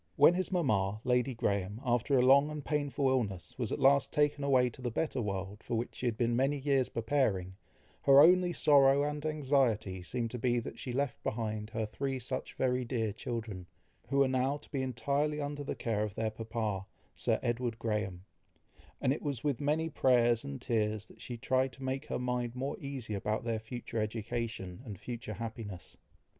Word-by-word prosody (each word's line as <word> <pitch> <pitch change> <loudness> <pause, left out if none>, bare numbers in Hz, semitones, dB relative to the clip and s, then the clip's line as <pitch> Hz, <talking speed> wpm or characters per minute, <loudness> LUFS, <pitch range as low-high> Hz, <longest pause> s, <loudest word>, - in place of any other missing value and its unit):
When 145 - +7
his 185 +2 -1
mama, 110 - +1
Lady 125 +1 +1
Graham, 100 -1 -1
after 120 +3 +2
a 125 - +4
long 140 +3 +6
and 150 -2 -6
painful 145 -2 0
illness, 110 -9 -1
was 120 -4 -1
at - - 0
last 140 0 +4
taken 145 -1 +1
away 130 -3 +4
to 120 - -11
the 125 - -1
better 130 +2 -1
world, 100 0 -4
for 120 - -3
which 115 +2 -2
she 125 - -3
had 115 -2 -1
been 120 0 +1
many 135 +4 +2
years 135 -2 +1
preparing, 110 -7 0 0.5
her 140 0 +7
only 180 +3 +6
sorrow 140 -3 +5
and 150 0 -2
anxiety 130 -10 +1
seemed 115 +5 -3
to 125 - -4
be 120 0 +2
that 115 - -5
she 130 - -4
left 135 +1 -1
behind 110 -1 -3
her 110 0 -2
three 135 +5 -3
such 130 +1 -4
very 125 -1 +1
dear 115 -4 -1
children, 110 -5 -5 0.4
who 140 - 0
were 140 -1 +5
now 130 +2 +1
to - - -18
be 135 - -1
entirely 140 +5 0
under 145 0 -3
the - - -3
care 110 -3 -1
of 105 -3 -4
their 110 -1 -1
papa, 110 -3 -3 0.3
Sir - - 0
Edward 120 -1 -1
Graham; 105 -5 -2 0.7
and 130 - +2
it - - -5
was 140 -6 -3
with 145 -4 0
many 155 +3 +1
prayers 120 -5 +3
and 140 -1 -6
tears 110 -3 0
that - - -18
she 120 - -5
tried 130 +2 +1
to 135 - -10
make 135 +2 -2
her - - -2
mind 125 -1 -2
more 135 +2 -2
easy 135 -6 -5
about 105 +3 -1
their 115 -1 -1
future 115 0 -5
education, 110 -3 -3
and 105 -7 -8
future 120 -2 -6
happiness. 110 -5 -7
125 Hz, 195 wpm, -32 LUFS, 110-140 Hz, 0.7 s, When